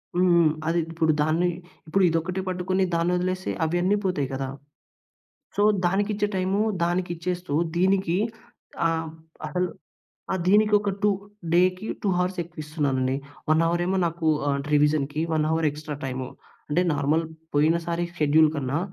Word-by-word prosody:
హ్మ్. 180 +1 +3
హ్మ్. 170 -3 +5 0.2
అది 170 +1 +2
ఇప్పుడు 160 -1 +2
దాన్ని 165 +4 +2 0.4
ఇప్పుడు 195 +4 +2
ఇదొక్కటి 165 +3 -1
పట్టుకొని 185 +1 0
దాన్నొదిలేసి 180 +2 0 0.2
అవన్ని 175 +5 +1
పోతాయి 150 -8 0
కదా! 135 0 -3 1.1
సో - - +4 0.2
దానికి 200 +4 +1
ఇచ్చే 205 0 0
టైము 190 +2 0 0.2
దానికిచ్చేస్తూ, 175 -1 -2 0.2
దీనికీ 190 -1 +2 0.7
ఆహ్, 160 -1 -1 0.4
అసలు 180 +4 0 0.7
ఆ! - - +1
దీనికి 210 +2 +4
ఒక 205 0 -2
2 210 - +5 0.4
డేకి 185 +3 +3 0.2
2 - - -1
హవర్స్ 180 +1 0
ఎక్కువిస్తున్నానండి. 150 -5 -2 0.3
1 155 +1 +4
అవర్ 170 +1 0
ఏమో 190 +1 0
నాకు 165 -1 -2 0.2
ఆహ్, 140 0 +1
రివిజన్‍కి 150 0 +2
1 155 -1 +2
అవర్ 160 0 +1
ఎక్స్‌ట్రా 150 0 -6
టైము. 130 -1 -4 0.4
అంటే 155 +4 +2
నార్మల్ 145 +3 +1 0.3
పోయినసారి 170 +3 +1 0.2
షెడ్యూల్ 155 +1 +5
కన్నా 140 +1 -1
170 Hz, 135 wpm, -25 LUFS, 155-185 Hz, 1.1 s, హ్మ్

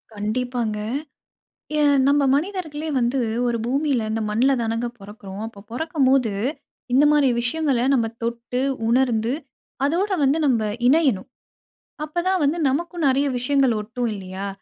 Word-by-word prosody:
கண்டிப்பாங்க. 225 +1 -2 1.0
ஏன் 290 -1 +4
நம்ம 285 0 +4
மனிதர்களே 320 -2 -3
வந்து 245 +2 +1 0.3
ஒரு 235 -1 0
பூமியில 265 -3 0
இந்த 225 0 -1
மண்ல 240 +6 +3
தானங்க 230 +1 -1
பொறக்கிறோம். 200 0 -9
அப்போ, 225 -3 -12
பொறக்கும்போது, 270 -4 +1 0.6
இந்த 275 +3 +5
மாரி 295 -2 +4
விஷயங்கள 270 0 0
நம்ம 240 -4 +2 0.2
தொட்டு, 235 +2 -2 0.3
உணர்ந்து 235 -1 +2 0.5
அதோடு 375 +7 +1
வந்து 275 +3 +3
நம்ம 245 -5 +2 0.3
இணையணும். 270 - +3 0.8
அப்பதான் 350 +4 0
வந்து 295 +4 +1
நமக்கும் 335 +4 -2
நிறைய 275 +2 +2
விஷயங்கள் 265 0 +2
ஒட்டும் 235 +3 -3
இல்லயா! 190 0 -6
255 Hz, 125 wpm, -22 LUFS, 230-295 Hz, 1.0 s, இந்த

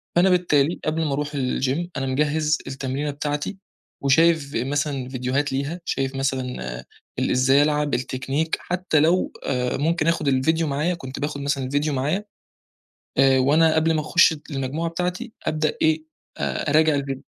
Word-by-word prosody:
فأنا 180 +2 +5
بالتالي 170 -4 +2
قبل 160 +1 0
ما 145 - -1
أروح 145 +1 -2
الgym، 135 +4 -1
أنا 135 - -1
مجَهّز 150 +4 +1
التمرينة 135 +2 -3
بتاعتي 145 +5 -3 0.4
وشايف 155 +1 +3
ف - - -8
مثلًا 140 -2 -2
فيديوهات 130 +2 -1
ليها، 140 +6 -2
شايف 135 0 -2
مثلًا 125 - -3 0.3
ال - - 0
إزاي 130 +3 +4
ألعب، 150 -1 0
التكنيك 135 +5 -1
حتى 180 -3 0
لو 165 +5 +2
آآ، 125 -2 -1
ممكن 160 +2 0
آخد 165 -3 +1
الفيديو 160 +5 +2
معايا، 150 +5 0
كنت 130 -6 -7
باخد 145 0 -3
مثلًا 140 -1 -1
الفيديو 145 +3 0
معايا، 150 +10 -1 0.9
آآ، 135 -1 +5
وأنا 155 +5 +4
قبل 160 +1 +2
ما 155 - +1
أخُشّ 160 +2 +4 0.2
المجموعة 145 +4 -2
بتاعتي 180 +7 -3
أبدأ 155 -1 0
إيه، 155 0 +2 0.3
أ - - -2
أراجع 155 +1 +4
الفيديو. 135 -1 -3
145 Hz, 155 wpm, -23 LUFS, 135-160 Hz, 0.9 s, فأنا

